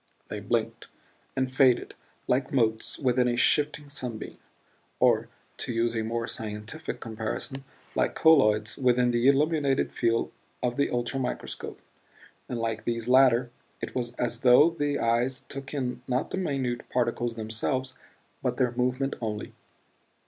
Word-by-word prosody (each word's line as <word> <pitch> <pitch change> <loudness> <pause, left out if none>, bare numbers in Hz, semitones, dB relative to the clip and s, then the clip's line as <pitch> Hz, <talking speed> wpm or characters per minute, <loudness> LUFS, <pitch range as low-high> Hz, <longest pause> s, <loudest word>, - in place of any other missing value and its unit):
They - - -4
blinked - - -2 0.5
and 130 -1 -1
faded 130 -3 +3 0.3
like 130 +1 +1
motes 110 -4 +1
within 125 -2 +2
a 120 - +1
shifting 150 +2 +2
sunbeam; 125 -6 -6 0.6
or, - - +3 0.3
to - - -3
use 115 0 0
a 110 - 0
more 115 +1 -2
scientific 110 +7 -5
comparison, 115 +4 -4 0.3
like - - 0
colloids 110 -9 +4
within 125 -1 +3
the 120 +1 +2
illuminated 140 -1 +2
field 115 -1 +1 0.3
of 120 -1 0
the 140 - +3
ultramicroscope; 125 +2 -3 0.7
and 125 - -2
like 115 -1 -2
these 115 -1 -2
latter 125 -1 +5 0.3
it - - -5
was 120 -2 -3
as 120 -1 -2
though 130 +6 +6
the 145 -3 -1
eyes 120 +3 +1
took 140 -1 -8
in 130 -4 -3
not 130 +1 -1
the - - -2
minute 135 -9 -2
particles 120 -1 0
themselves 115 +4 -2 0.5
but 125 -1 -1
their 125 -2 +2
movement 125 +3 0
only. 105 -2 -4
125 Hz, 140 wpm, -27 LUFS, 115-135 Hz, 0.7 s, though